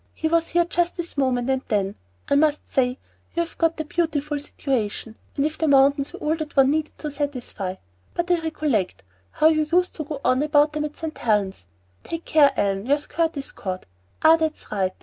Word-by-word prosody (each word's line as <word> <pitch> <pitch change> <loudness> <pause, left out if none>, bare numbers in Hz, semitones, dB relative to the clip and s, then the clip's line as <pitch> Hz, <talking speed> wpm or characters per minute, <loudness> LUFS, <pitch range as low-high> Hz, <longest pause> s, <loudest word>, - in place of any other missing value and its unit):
"He 320 - -1
was 330 +1 +2
here 345 0 +2
just 345 +1 0
this 345 0 -5
moment, 260 -3 +1
and 265 -1 +1
then 200 -3 0 0.3
I - - +1
must 295 +1 +2
say 250 -1 +1 0.4
you 340 - +2
have 335 - -10
got 330 -1 +2
a 315 - -2
beautiful 300 -2 -1
situation; 230 -6 -3 0.2
and 280 - +2
if 310 +1 -3
mountains 280 -2 +4
were - - -9
all 305 +1 +1
that 310 -2 -6
one 270 0 +6
needed 310 0 -2
to 300 - -4
satisfy 255 -10 -3 0.4
but 345 +1 -1
I 350 - +4
recollect 300 - -1 0.3
how 310 - +4
you 310 -1 +1
used 360 +1 +3
to 310 - -2
go 295 -1 -5
on 255 +2 +3
about 295 0 +3
them 300 0 -1
at 300 - -7
St. 320 -1 -5
Helen's 200 - 0 0.4
Take 330 0 -5
care, 290 -3 +5
Ellen, 200 +2 0
your 285 +2 +4
skirt 320 +2 -1
is 275 - -5
caught! 185 -6 -5 0.4
Ah, 320 +1 +8
that's 315 -1 -3
right! 190 -3 0
295 Hz, 205 wpm, -24 LUFS, 255-320 Hz, 0.4 s, Ah